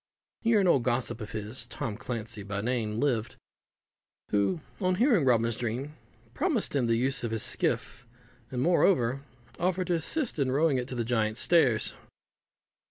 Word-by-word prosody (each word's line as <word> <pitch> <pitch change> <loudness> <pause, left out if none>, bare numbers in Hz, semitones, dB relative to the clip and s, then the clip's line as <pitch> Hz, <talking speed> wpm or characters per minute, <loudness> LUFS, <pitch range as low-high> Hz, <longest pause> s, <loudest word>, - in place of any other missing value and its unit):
Here 230 -2 +3
an 190 - +3
old 140 -7 +4
gossip 120 -1 -1
of 105 - -6
his 110 +3 -4
(Tom 120 -4 -4
Clancey 115 -2 -5
by 100 0 -4
name) 115 -2 -1
lived, 120 -6 0 1.0
who, 105 - +1 0.2
on 185 -1 +1
hearing 225 - +3
Robin's 115 -2 +3
dream, 125 +6 -3 0.4
promised 290 - 0
him 130 -4 +2
the 115 - +3
use 130 +3 +1
of 120 - -1
his 110 -1 -1
skiff, 125 - -1 0.4
and, 125 0 -2
moreover, 140 -7 +3 0.4
offered 185 +1 0
to - - +3
assist 220 - 0
in 135 -2 +1
rowing 145 -1 +2
it 125 - -4
to 130 - -5
the 120 -2 -1
Giant's 110 -1 0
Stairs. 135 -10 +3
125 Hz, 165 wpm, -28 LUFS, 115-165 Hz, 1.0 s, old